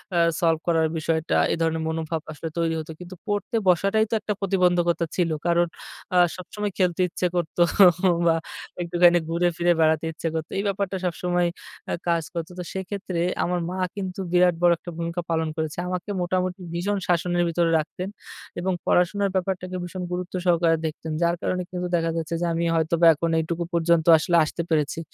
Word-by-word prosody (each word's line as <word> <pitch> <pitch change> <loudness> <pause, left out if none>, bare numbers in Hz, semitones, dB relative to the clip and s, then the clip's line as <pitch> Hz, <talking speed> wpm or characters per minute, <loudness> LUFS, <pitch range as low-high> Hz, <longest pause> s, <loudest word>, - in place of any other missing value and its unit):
আ - - +2 0.2
solve 165 -2 +2
করার 160 -1 +3
বিষয়টা, 160 0 0
এই - - 0
ধরনের 160 0 0
মনোভাব 160 0 -2
আসলে 160 +2 -6
তৈরি 165 -1 +1
হত। 155 - -8
কিন্তু 180 +1 -9
পড়তে 205 +2 -2
বসাটাই 195 +5 +3
তো - - -4
একটা 210 -1 -2
প্রতিবন্ধকতা 180 -3 +2
ছিল। 175 -2 +1 0.2
কারণ 170 0 +3 0.5
আ - - +5 0.2
সবসময় 205 +3 -5
খেলতে 180 -1 +1
ইচ্ছে 180 +1 -3
করতো 175 0 -1 0.7
বা 165 - +4 0.5
একটুখানি 175 0 +4
ঘুরে 170 +1 +1
ফিরে 175 0 +3
বেড়াতে 160 0 +3
ইচ্ছা 160 +1 -5
করত। 160 0 -2
এই 200 - 0
ব্যাপারটা 195 -1 -1
সবসময় 175 0 0 0.4
আ - - 0
কাজ 170 -1 +2
করত। 165 -1 -3
তো - - -3
সেক্ষেত্রে 190 -2 -4 0.2
আমার 180 0 0
মা 185 - -4 0.2
কিন্তু 190 -1 -5
বিরাট 180 -1 +4
বড় 175 - +6
একটা 175 - -9
ভূমিকা 170 +1 -3
পালন 160 -1 +1
করেছে। 155 0 -3
আমাকে 180 +2 -4
মোটামুটি 185 +1 -1
ভীষণ 200 +4 -1
শাসনের 175 0 +1
ভিতরে 170 0 +1
রাখতেন। 180 +5 -5 0.5
এবং 185 +1 0
পড়াশোনার 195 +3 +2
ব্যাপারটাকে 185 0 -2
ভীষণ 180 +1 -6
গুরুত্ব 180 +2 -4
সহকারে 170 -2 +3
দেখতেন। 160 0 -4
যার 170 0 +2
কারণে 180 0 -1
কিন্তু 180 0 -3
দেখা 165 -1 0
যাচ্ছে 165 +1 -2
যে, - - +1
আমি 170 +1 -1
হয়তোবা 165 +1 +3
এখন 165 +2 -2
এইটুকু 170 +2 -2
পর্যন্ত 170 -1 +2
আসলে 170 +2 +2
আসতে 170 - -4
পেরেছি। 155 0 0
175 Hz, 175 wpm, -24 LUFS, 165-180 Hz, 0.7 s, বড়